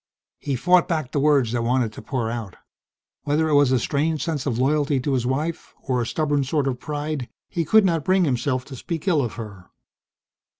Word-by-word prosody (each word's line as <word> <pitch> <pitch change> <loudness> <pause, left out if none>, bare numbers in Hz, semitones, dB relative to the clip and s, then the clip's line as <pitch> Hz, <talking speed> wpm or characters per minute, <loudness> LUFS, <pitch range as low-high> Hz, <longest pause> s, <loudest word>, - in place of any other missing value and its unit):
He 140 - -2
fought 180 +7 +4
back 155 -6 -2
the 145 - 0
words 140 -5 +3
that 120 -1 0
wanted 120 -2 +1
to - - -9
pour 120 -5 -2
out. 115 -6 -5 0.7
Whether 150 +2 +1
it - - +1
was 145 -2 +5
a 130 - +4
strange 150 +5 0
sense 150 -5 -2
of 120 -4 -1
loyalty 145 +1 +1
to 135 +2 -1
his 125 -2 0
wife, 155 +6 -3
or 125 -2 0
a 115 - -2
stubborn 145 -1 0
sort 140 +1 0
of 130 -2 -2
pride, 150 -3 -4 0.2
he 170 - -1
could 215 +6 +5
not 165 -4 +1
bring 185 +1 +3
himself 130 -1 -1
to 135 - -9
speak 165 +7 -5
ill 165 -6 +3
of 120 -4 -3
her. 100 -4 -9
140 Hz, 210 wpm, -23 LUFS, 125-155 Hz, 0.7 s, was